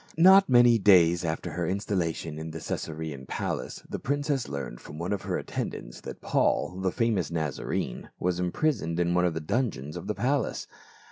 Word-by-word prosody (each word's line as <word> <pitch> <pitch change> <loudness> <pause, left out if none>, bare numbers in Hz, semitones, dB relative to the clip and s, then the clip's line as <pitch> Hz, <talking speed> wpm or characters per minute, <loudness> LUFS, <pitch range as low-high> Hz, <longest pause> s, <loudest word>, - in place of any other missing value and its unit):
Not 190 +2 +7
many 120 -2 +6
days 85 -4 +5
after 80 -1 -2
her 85 -2 -2
installation 85 -5 -2
in 80 +1 -5
the 80 - -6
Caesa 80 0 -4
rean 75 -5 -6
palace - - -4
the - - -5
princess 145 -2 -1
learned 70 -4 -5
from 75 - -10
one 85 +5 -2
of 100 - -2
her - - -2
attendants - - -5
that - - -8
Paul, 90 +1 +1
the 95 -1 +1
famous 115 -7 0
Nazarene, 80 -5 -3
was 90 0 0
impri 150 - +1
soned 85 - -4
in 85 0 +2
one 90 0 +3
of 85 -2 0
the - - -1
dungeons 75 - -2
of 90 - -6
the 105 - -1
palace. 130 +7 0
90 Hz, 190 wpm, -28 LUFS, 80-115 Hz, -, Not